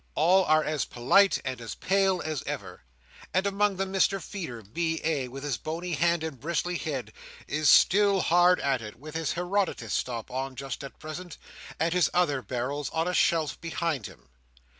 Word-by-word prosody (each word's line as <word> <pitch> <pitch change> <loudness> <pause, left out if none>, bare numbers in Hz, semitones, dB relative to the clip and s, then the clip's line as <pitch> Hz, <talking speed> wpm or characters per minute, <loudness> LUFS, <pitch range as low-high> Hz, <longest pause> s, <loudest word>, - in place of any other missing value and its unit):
All 180 +4 +4
are 155 -1 +4
as 155 -2 -1
polite 195 +12 +3
and 130 -2 -4
as 115 - -6
pale 190 -1 +1
as 155 -5 -2
ever; - - -5 0.5
and 190 +1 +2
among 200 0 +1
them, 190 0 -3
Mr 195 +1 +2
Feeder, 165 - -7
B.A., 160 - -1
with 135 +3 -8
his 140 -5 -1
bony 170 +3 -4
hand 170 +1 +2
and 155 -5 -5
bristly 170 +4 -1
head, 140 -5 -4 0.3
is 150 -1 +2
still 200 0 +5
hard 175 +2 +4
at 135 -3 +1
it; 105 -1 -8
with 150 +4 -11
his 160 -2 -1
Herodotus 180 +2 -1
stop 120 -3 -3
on 130 +1 -3
just 135 +1 -6
at 140 - -9
present, 155 +2 -8 0.4
and 165 +2 +1
his 180 -4 +3
other 145 -7 +2
barrels 130 +5 -3
on 165 +1 -1
a 180 - -1
shelf 160 -4 +1
behind 165 -7 -2
him. - - -17
160 Hz, 180 wpm, -28 LUFS, 135-180 Hz, 0.5 s, still